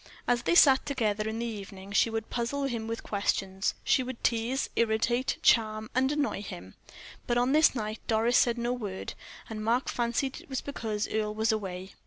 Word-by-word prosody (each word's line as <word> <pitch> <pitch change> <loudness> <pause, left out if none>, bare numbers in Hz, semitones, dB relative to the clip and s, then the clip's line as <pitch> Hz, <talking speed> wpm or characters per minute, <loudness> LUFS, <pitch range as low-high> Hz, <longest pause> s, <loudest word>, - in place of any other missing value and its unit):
As 245 -1 +2
they 345 - +1
sat 270 -6 +7
together 220 -6 -1
in 220 - -4
the 235 - -2
evening, 200 -3 -7
she 200 - +3
would 225 -1 -4
puzzle 245 +4 -1
him 235 -5 -2
with 230 0 -4
questions 195 -1 -1
she - - +3
would 255 -1 -6
tease, 235 +3 0
irritate, 235 +3 +1
charm, 215 -1 +3
and 260 +2 +2
annoy 295 -8 -1
him. 95 - -9 0.5
But 240 - +1
on 245 +2 +2
this 310 -1 +5
night 215 -2 -3
Doris 230 +2 +2
said 240 -1 +4
no 240 +1 -1
word, 205 -6 -5 0.3
and 215 -1 -5
Mark 235 +4 +1
fancied 240 +3 -1
it - - -19
was 265 -2 -2
because 220 -6 -3
Earle 215 -1 -2
was 220 +1 +2
away. 190 -3 -4
230 Hz, 190 wpm, -29 LUFS, 215-245 Hz, 0.5 s, sat